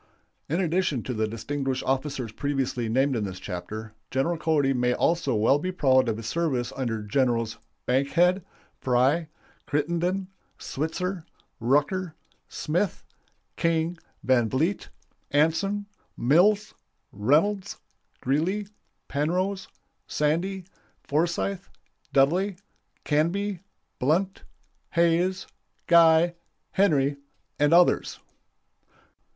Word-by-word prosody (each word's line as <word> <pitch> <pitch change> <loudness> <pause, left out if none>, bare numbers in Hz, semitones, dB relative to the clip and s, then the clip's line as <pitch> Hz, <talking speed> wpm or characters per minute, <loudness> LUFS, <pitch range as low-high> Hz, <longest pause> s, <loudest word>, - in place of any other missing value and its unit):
In 165 +5 0
addition 170 - 0
to 130 - -3
the 110 -1 0
distinguished 130 +4 -3
officers 135 -3 -2
previously 135 -3 -2
named 135 +3 +2
in 110 - -1
this 95 -2 -5
chapter, 110 +5 -6 0.2
General 135 +7 0
Cody 155 -4 +1
may 125 -1 +1
also 165 -7 +1
well 115 +7 +3
be 185 +4 -2
proud 130 -7 +3
of 110 - -1
his 115 - -7
service 130 -2 -1
under 115 -5 -2
Generals 115 0 0 0.3
Bankhead, 170 +8 +2 0.4
Fry, 135 +6 +2 0.4
Crittenden, 170 +6 0 0.3
Switzer, 170 +4 -3 0.4
Rucker, 150 - +1 0.3
Smith, 175 +4 -1 0.5
King, 165 +1 0 0.3
Van 120 -3 +3
Vliet, 160 - -1 0.4
Anson, 165 +8 +1 0.3
Mills, 195 - +3 0.4
Reynolds, 165 - +1 0.4
Greeley, 180 +10 0 0.4
Penrose, 180 +7 -1 0.4
Sandy, 175 +6 0 0.4
Forsyth, 175 +5 -1 0.4
Dudley, 175 +9 +3 0.5
Canby, 175 +6 0 0.4
Blunt, 180 +9 0 0.5
Hayes, 170 +3 +2 0.4
Guy, 170 0 +6 0.4
Henry, 145 -8 +2 0.4
and 145 +1 +3
others. 175 +1 +4
150 Hz, 95 wpm, -26 LUFS, 130-180 Hz, 0.5 s, Guy